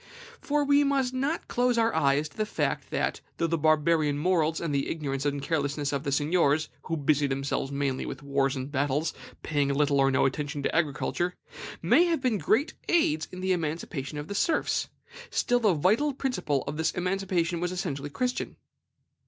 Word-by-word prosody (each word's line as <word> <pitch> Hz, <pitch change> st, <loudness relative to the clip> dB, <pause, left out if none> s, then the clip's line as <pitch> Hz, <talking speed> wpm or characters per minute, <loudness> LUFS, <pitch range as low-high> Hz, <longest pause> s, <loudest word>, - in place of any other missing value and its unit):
For 295 Hz, 0 st, 0 dB
we 285 Hz, +1 st, +5 dB
must 270 Hz, -3 st, +1 dB
not 275 Hz, +6 st, -1 dB
close 245 Hz, 0 st, +1 dB
our 230 Hz, 0 st, +2 dB
eyes 145 Hz, -1 st, +2 dB
to 145 Hz, -, -23 dB
the 215 Hz, -, +1 dB
fact -, -, -2 dB
that, -, -, -1 dB, 0.2 s
though 165 Hz, -, +1 dB
the 165 Hz, 0 st, +1 dB
Barbarian 155 Hz, -1 st, +2 dB
morals 160 Hz, -1 st, +1 dB
and 165 Hz, -4 st, -2 dB
the 140 Hz, -1 st, 0 dB
ignorance 140 Hz, -3 st, -2 dB
and 145 Hz, 0 st, -1 dB
carelessness 145 Hz, -2 st, -1 dB
of 140 Hz, 0 st, -1 dB
the 140 Hz, -, -2 dB
seigniors, 150 Hz, +1 st, +2 dB, 0.2 s
who 165 Hz, -, -2 dB
busied 145 Hz, -1 st, +2 dB
themselves 135 Hz, 0 st, -2 dB
mainly 140 Hz, -2 st, -1 dB
with -, -, -7 dB
wars 140 Hz, -1 st, +1 dB
and 130 Hz, +1 st, -5 dB
battles, 145 Hz, +2 st, 0 dB, 0.3 s
paying 145 Hz, -3 st, +1 dB
little 140 Hz, 0 st, +2 dB
or 135 Hz, 0 st, +4 dB
no 130 Hz, -, +3 dB
attention 145 Hz, +2 st, -2 dB
to -, -, -1 dB
agriculture, 170 Hz, +3 st, 0 dB, 0.5 s
may 250 Hz, -, +5 dB
have 335 Hz, -2 st, +1 dB
been 250 Hz, -6 st, 0 dB
great 225 Hz, -, +1 dB, 0.2 s
aids 155 Hz, -, +2 dB
in 185 Hz, -, -7 dB
the 190 Hz, 0 st, 0 dB
emancipation 155 Hz, -4 st, -3 dB
of 150 Hz, +1 st, -5 dB
the -, -, -4 dB
serfs, 315 Hz, +10 st, 0 dB, 0.4 s
still 245 Hz, 0 st, +1 dB
the 210 Hz, -7 st, +3 dB
vital 220 Hz, -, +2 dB
principle 155 Hz, -, -1 dB
of 150 Hz, -, -4 dB
this 160 Hz, 0 st, +1 dB
emancipation 180 Hz, -2 st, -1 dB
was 180 Hz, +1 st, -1 dB
essentially 150 Hz, -6 st, -3 dB
Christian. 250 Hz, -, -2 dB
155 Hz, 185 wpm, -28 LUFS, 145-195 Hz, 0.5 s, we